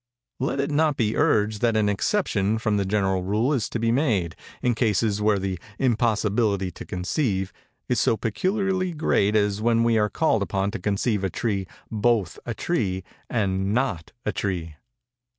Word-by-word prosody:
Let 135 +1 -1
it 140 +2 0
not 150 -1 +2
be 110 -2 +1
urged 105 0 +2
that 115 -2 +2
an 105 -1 +2
exception 105 - +1
from 110 -2 0
the 100 -1 0
general 95 -2 +1
rule 105 +9 +1
is 125 -6 -1
to - - -2
be 115 0 +1
made, 110 - +1 0.3
in 125 - +3
cases 105 -2 +1
where 105 -1 +3
the 95 -2 -3 0.2
'impossibility 110 -5 +1
to - - -9
conceive' 95 - -1 0.3
is - - +1
so 115 - +2
peculiarly 185 - 0
great 110 -9 +1
as 105 -1 +1
when 115 0 +3
we 115 -1 +3
are 105 0 +2
called 155 -8 +1
upon 100 0 -1
to 115 - -5
conceive 105 0 0
a 95 - +1
tree 100 -1 -2 0.2
both 110 -4 +1
a 120 - -2
tree 95 - -1 0.3
and 100 -3 0
not 100 -11 -1
a 105 - +1
tree. 90 -7 -3
105 Hz, 170 wpm, -24 LUFS, 100-120 Hz, 0.3 s, in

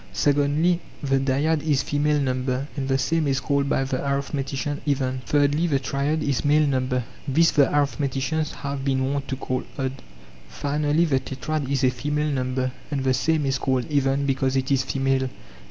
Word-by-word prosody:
Secondly 145 +4 +2 0.2
the 135 -1 +2
dyad 145 +4 +1
is 145 -3 +1
female 145 +1 +1
number, 130 0 -1
and 135 -2 -2
the 135 0 +2
same 160 +3 +1
is 135 -1 +1
called 140 +1 0
by 135 - +2
the 130 -1 -2
arithmeticians 140 +1 -2
even. 130 -3 -1
Thirdly 145 +3 +2
the 145 -4 +2
triad 140 +3 -1
is 140 -4 0
male 150 +1 +4
number; 130 -2 0 0.2
this 165 +5 +4
the 145 -3 +4
arithmeticians 145 +1 0
have 140 -1 -3
been 135 0 0
wont 140 -1 -3
to 135 - -2
call 130 -1 -3
odd. 130 -2 -1 0.6
Finally 150 +3 +1
the 135 -5 +2
tetrad 135 +2 -4
is 140 -1 0
a 130 - +4
female 150 +4 -1
number, 130 0 -1 0.2
and 140 -3 -2
the 130 -1 +2
same 155 +3 +1
is 135 0 0
called 130 -2 0
even 140 -1 +2
because 135 -1 0
it 130 +1 0
is 135 -1 +3
female. 135 0 0
140 Hz, 180 wpm, -24 LUFS, 130-145 Hz, 0.6 s, male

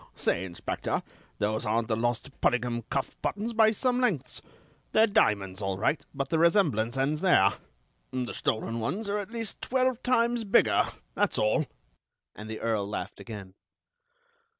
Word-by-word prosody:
"Say, 85 - 0
Inspector, 85 -2 -3 0.3
those 110 +1 0
aren't 110 +1 0
the 110 - +1
lost 120 +3 -1
Puddingham 120 -1 +1
cuff 135 - -2
buttons 220 +3 -2
by 220 -1 +6
some 250 +3 +1
lengths. 205 - 0 0.5
They're 220 - +6
diamonds, 100 - +1
all 95 -1 -1
right, 115 +9 +1
but 135 0 -3
the 160 - +1
resemblance 155 - +3
ends 145 +4 0
there. 100 - +5 0.6
The 125 -1 -3
stolen 115 +1 -1
ones 195 - -2
are 210 - 0
at 205 - -5
least 225 -2 -5
twelve 255 -1 +1
times 240 -2 +2
bigger; 200 - +4 0.3
that's - - +1
all." 110 +8 +2 0.7
And 105 +1 -8
the 110 - -5
Earl 110 -3 0
laughed 105 -1 -5
again. 105 -5 -8
130 Hz, 150 wpm, -28 LUFS, -, 0.7 s, by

